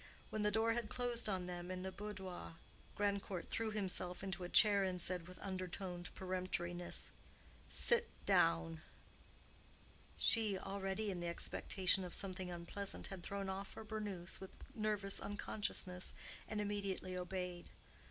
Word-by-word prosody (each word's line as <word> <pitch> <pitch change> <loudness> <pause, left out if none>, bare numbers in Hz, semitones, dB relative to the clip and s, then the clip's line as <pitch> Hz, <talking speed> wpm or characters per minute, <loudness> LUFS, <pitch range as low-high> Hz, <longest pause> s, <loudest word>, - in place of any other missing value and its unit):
When 215 - 0
the 210 - +4
door 220 +2 +3
had 235 -2 -1
closed 240 -2 +1
on 185 -2 0
them 175 0 -4
in 185 0 -3
the 190 - -2
boudoir, 190 -4 -6 0.4
Grandcourt 200 -3 0
threw 225 -1 +1
himself 190 -3 +1
into 190 -1 -2
a 175 - -3
chair 205 -1 +7
and 185 -1 0
said, 175 -1 0
with 180 - -9
undertoned 185 -2 -3
peremptoriness, 180 -2 -1 0.6
"Sit - - +7 0.2
down." 80 -1 +4 1.4
She, 215 -4 +3
already 195 +2 -1
in 180 - -3
the 175 - -2
expectation 185 +2 +2
of 180 - -3
something 185 -2 -3
unpleasant, 175 +3 -3
had 190 -2 -5
thrown 200 +2 -3
off 190 +1 -4
her - - -6
burnous 205 -5 -2
with 190 - -8 0.2
nervous 210 -2 0
unconsciousness, 195 -3 -2 0.3
and 215 - -1
immediately 200 -3 -1
obeyed. 180 -1 -3
190 Hz, 140 wpm, -40 LUFS, 180-205 Hz, 1.4 s, chair